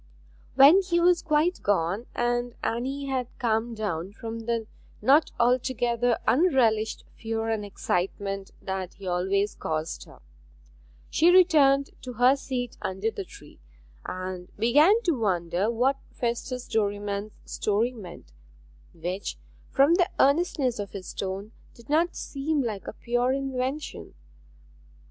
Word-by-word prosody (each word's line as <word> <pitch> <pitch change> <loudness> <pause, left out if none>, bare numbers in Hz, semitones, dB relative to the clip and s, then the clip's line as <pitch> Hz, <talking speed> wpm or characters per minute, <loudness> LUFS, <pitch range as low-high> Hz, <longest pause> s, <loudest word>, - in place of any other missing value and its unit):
When 285 +8 +8
he 350 -2 0
was 345 0 +4
quite 320 +3 +1
gone, 200 +3 0
and 240 0 -1
Anne 265 +5 -2
had 260 -3 -2
calmed 230 0 -1
down 195 -3 -3
from 230 +2 -6
the 230 -1 0 0.3
not 280 +8 +4
altogether 245 -1 +2
unrelished 240 -8 +2
fear 225 0 -3
and 220 -2 -1
excitement 195 0 -2
that 190 -1 -4
he 195 - -11
always 190 +3 0
caused 160 +1 -4
her, - - -16 0.9
she 335 - +4
returned 295 -7 +5
to 250 - -7
her 250 +3 +5
seat 255 -3 -4
under 190 +4 -2
the 400 - -5
tree, 410 +2 -15 0.4
and 185 -1 -6
began 300 - +4
to 350 - +2
wonder 190 - 0
what 250 +4 +1 0.2
Festus 245 +1 -3
Derriman's 205 -1 -2
story 220 +4 0
meant, 175 - -11 0.6
which, 180 +4 -4 0.3
from 280 +4 +4
the 355 +1 +3
earnestness 280 -5 +2
of 200 -1 -5
his 190 -2 -7
tone, 195 +2 -4 0.2
did 235 +1 -17
not 335 +3 +2
seem 285 +1 -2
like 215 -5 -4
a - - -5
pure 245 +1 0
invention. 270 +1 -4
235 Hz, 130 wpm, -26 LUFS, 200-275 Hz, 0.9 s, When